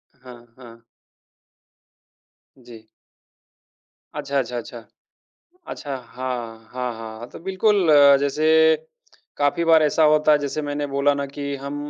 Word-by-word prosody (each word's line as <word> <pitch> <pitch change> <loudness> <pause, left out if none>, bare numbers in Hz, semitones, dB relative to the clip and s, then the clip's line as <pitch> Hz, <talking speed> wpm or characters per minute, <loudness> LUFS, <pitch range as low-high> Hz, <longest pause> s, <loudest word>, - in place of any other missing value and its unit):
हाँ, 125 -2 -15
हाँ। 115 -2 -15 1.8
जी। 120 -3 -15 1.3
अच्छा, 140 0 -2
अच्छा, 125 -1 -4
अच्छा। 120 0 -8 0.9
अच्छा, 145 -2 -6
हाँ, 120 -3 -7
हाँ, 125 -1 -3
हाँ। 115 +1 -9
तो - - -11
बिल्कुल, 190 0 +1 0.3
जैसे 160 +3 +3 0.6
काफ़ी 145 +4 0
बार 160 -1 +5
ऐसा 155 +1 +1
होता 155 0 +3
है, 150 - +4
जैसे 145 +1 -4
मैंने 145 0 -3
बोला 140 +1 +1
ना 140 0 -3
कि 140 0 -6
हम 140 +1 -7
140 Hz, 120 wpm, -22 LUFS, 125-150 Hz, 1.8 s, बार